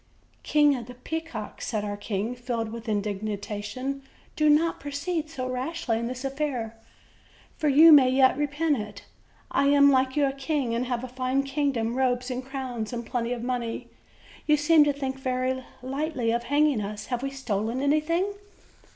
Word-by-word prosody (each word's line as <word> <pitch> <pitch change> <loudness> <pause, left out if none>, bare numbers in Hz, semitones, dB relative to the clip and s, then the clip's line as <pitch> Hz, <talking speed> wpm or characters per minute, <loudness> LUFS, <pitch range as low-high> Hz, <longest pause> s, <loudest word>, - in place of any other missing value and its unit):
"King 295 -2 +4
of 240 -3 -6
the 250 - -10
Peacocks," 265 -4 -6
said 215 -2 -2
our 205 0 -3
king, 205 +2 -3
filled 240 -3 -3
with 230 0 -7
in 205 -2 +1
dignation, 210 +6 -4 0.3
"do 305 -1 +3
not 320 +3 +3
proceed 300 +3 -3
so 255 -5 -4
rashly 255 -1 -2
in 235 - -2
this 255 +2 -5
affair, 270 -5 -2 0.8
for 305 - +2
you 310 +4 +8
may 275 -4 +8
yet 260 0 +4
repent 295 +1 0
it. 210 -1 -7 0.5
I 280 - +2
am, 280 0 +6
like 260 -1 +2
you, 295 -1 +3
a 270 - +1
king, 275 -2 -2
and 240 +2 -1
have 245 -1 -2
a - - -4
fine 255 +2 -1
kingdom, 275 -5 -1
robes 250 0 0
and 250 +1 -3
crowns, 255 -5 -5
and 240 -1 -4
plenty 235 0 -2
of 240 -1 -3
money; 245 -2 -3 0.6
you 300 -1 +5
seem 300 +1 +5
to 290 - +3
think 270 -1 -4
very 260 0 -1 0.2
lightly 270 -3 -1
of 235 +1 -1
hanging 285 -3 +2
us; 210 +1 -5
have 245 - -1
we 275 - -2
stolen 235 -3 -2
anything?" 305 +6 +2
260 Hz, 175 wpm, -26 LUFS, 235-285 Hz, 0.8 s, you